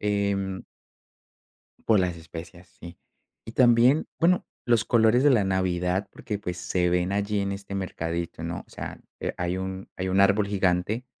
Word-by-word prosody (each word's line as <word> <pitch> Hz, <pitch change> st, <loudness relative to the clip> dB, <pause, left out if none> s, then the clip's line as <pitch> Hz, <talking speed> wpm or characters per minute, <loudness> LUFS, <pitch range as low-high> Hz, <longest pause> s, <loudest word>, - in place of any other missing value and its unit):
em 100 Hz, -2 st, -1 dB, 1.2 s
por 110 Hz, -3 st, +5 dB
las 90 Hz, -2 st, 0 dB
especias, 85 Hz, +2 st, -10 dB
sí. 85 Hz, 0 st, -10 dB, 0.5 s
Y 115 Hz, -, -8 dB
también 125 Hz, +4 st, +5 dB
bueno, 180 Hz, +2 st, +3 dB, 0.2 s
los 120 Hz, -2 st, +3 dB
colores 115 Hz, +1 st, +4 dB
de 145 Hz, -, +6 dB
la 120 Hz, -7 st, +4 dB
Navidad, 95 Hz, 0 st, 0 dB
porque 105 Hz, -2 st, -5 dB
pues 90 Hz, -3 st, -4 dB
se 90 Hz, 0 st, 0 dB
ven 90 Hz, +1 st, +1 dB
allí 100 Hz, +1 st, 0 dB
en 100 Hz, 0 st, -1 dB
este 100 Hz, 0 st, -6 dB
mercadito, 85 Hz, -3 st, -4 dB
¿no? 85 Hz, +1 st, -4 dB
O -, -, -27 dB
sea, -, -, -7 dB, 0.2 s
eh, -, -, -3 dB
hay 90 Hz, +1 st, -1 dB
un 95 Hz, 0 st, -5 dB
hay 95 Hz, -, -2 dB
un 95 Hz, +1 st, +3 dB
árbol 100 Hz, +1 st, +4 dB
gigante, 100 Hz, +4 st, 0 dB
95 Hz, 165 wpm, -26 LUFS, 90-105 Hz, 1.2 s, de